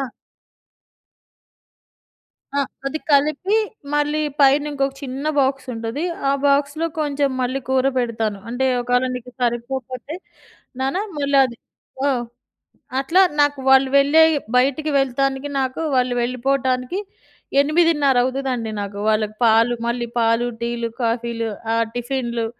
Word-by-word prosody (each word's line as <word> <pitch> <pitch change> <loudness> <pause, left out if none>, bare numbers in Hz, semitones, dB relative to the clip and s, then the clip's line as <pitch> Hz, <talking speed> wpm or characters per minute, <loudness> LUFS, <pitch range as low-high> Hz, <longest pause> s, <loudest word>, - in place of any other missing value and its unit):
ఆ! - - -1 2.6
ఆ! - - +3 0.3
అది 310 +3 -3
కలిపి 305 +8 +3 0.4
మళ్ళీ 295 +1 +1 0.2
పైన 280 +1 +5
ఇంకొక 275 -1 -1
చిన్న 270 +1 -5
బాక్స్ 270 -1 +1
ఉంటది. 230 +7 -4 0.3
ఆ - - +4
బాక్స్‌లో 285 +3 +2
కొంచెం 285 -2 0
మళ్ళీ 255 +2 -1
కూర 265 0 +2
పెడతాను. 225 -4 -1
అంటే 255 +2 -1
"ఒకవేళ 245 +1 +1
నీకు 250 0 -8
సరిపోకపోతే, 250 +4 -3 0.6
నాన్న 270 +6 0 0.2
మళ్లది" 275 -4 +2 0.5
ఆ! - - +3 0.9
అట్లా 325 +8 +3 0.2
నాకు 290 -1 +2
వాళ్ళు 265 0 +6
వెళ్ళే 300 +3 +6 0.3
బయటికి 280 +4 +2
వెళ్తానికి 270 +1 0
నాకు 260 +3 -2
వాళ్ళు 250 -1 +2
వెళ్ళిపోవటానికి, 255 +4 -1 0.6
8.30 295 -2 +3
అవుతదండి 255 -4 -2
నాకు. 200 0 -5
వాళ్ళకి 215 0 0
పాలు 230 +2 +4
మళ్ళీ 235 0 -2
పాలు, 230 +1 +2
టీలు, 235 -1 -2
కాఫీలు, 230 -1 -1 0.2
ఆహ్, 230 0 +1
టిఫిన్‌లు 240 -2 -2
260 Hz, 115 wpm, -21 LUFS, 240-280 Hz, 2.6 s, వాళ్ళు